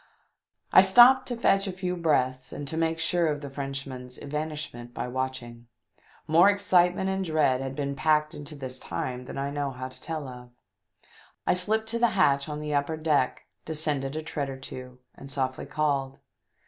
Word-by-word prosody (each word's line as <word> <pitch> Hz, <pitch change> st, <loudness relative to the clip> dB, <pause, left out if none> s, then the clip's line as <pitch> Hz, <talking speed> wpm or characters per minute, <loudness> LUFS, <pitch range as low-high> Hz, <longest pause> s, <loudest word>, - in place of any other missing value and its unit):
I -, -, +10 dB
stopped 245 Hz, +7 st, +7 dB
to 245 Hz, -, -3 dB
fetch 195 Hz, -3 st, +3 dB
a -, -, -2 dB
few 180 Hz, 0 st, -3 dB
breaths 130 Hz, -6 st, 0 dB
and 145 Hz, -, -6 dB
to 160 Hz, -, -5 dB
make 165 Hz, 0 st, 0 dB
sure 165 Hz, +1 st, +1 dB
of 145 Hz, -2 st, -1 dB
the 140 Hz, -2 st, -7 dB
Frenchman's 135 Hz, -2 st, -6 dB
evanishment 145 Hz, -5 st, -5 dB
by -, -, -3 dB
watching. 125 Hz, -2 st, -5 dB, 0.6 s
More 170 Hz, +5 st, +6 dB
excitement 190 Hz, -2 st, +3 dB
and 190 Hz, 0 st, -1 dB
dread 150 Hz, -6 st, +2 dB
had 135 Hz, 0 st, -4 dB
been 140 Hz, -1 st, -2 dB
packed 155 Hz, +1 st, +2 dB
into 150 Hz, +1 st, -8 dB
this 130 Hz, -2 st, -6 dB
time 125 Hz, 0 st, -4 dB
than -, -, -7 dB
I 140 Hz, +1 st, -2 dB
know 145 Hz, -1 st, -2 dB
how 130 Hz, 0 st, -6 dB
to 130 Hz, -, -12 dB
tell 155 Hz, -4 st, -4 dB
of. 125 Hz, -1 st, -10 dB, 1.0 s
I -, -, +4 dB
slipped 215 Hz, +5 st, +1 dB
to 235 Hz, +1 st, -2 dB
the 235 Hz, -, +5 dB
hatch 140 Hz, -3 st, +3 dB
on 150 Hz, 0 st, -4 dB
the 150 Hz, -1 st, -3 dB
upper 145 Hz, +2 st, 0 dB
deck, 150 Hz, -5 st, +1 dB, 0.2 s
descended 150 Hz, -3 st, -2 dB
a 155 Hz, -, -3 dB
tread 145 Hz, -3 st, -3 dB
or 135 Hz, -, -6 dB
two, 130 Hz, -1 st, -9 dB, 0.2 s
and 140 Hz, -, -12 dB
softly 130 Hz, -1 st, -2 dB
called. 140 Hz, -2 st, -1 dB
145 Hz, 185 wpm, -27 LUFS, 130-165 Hz, 1.0 s, I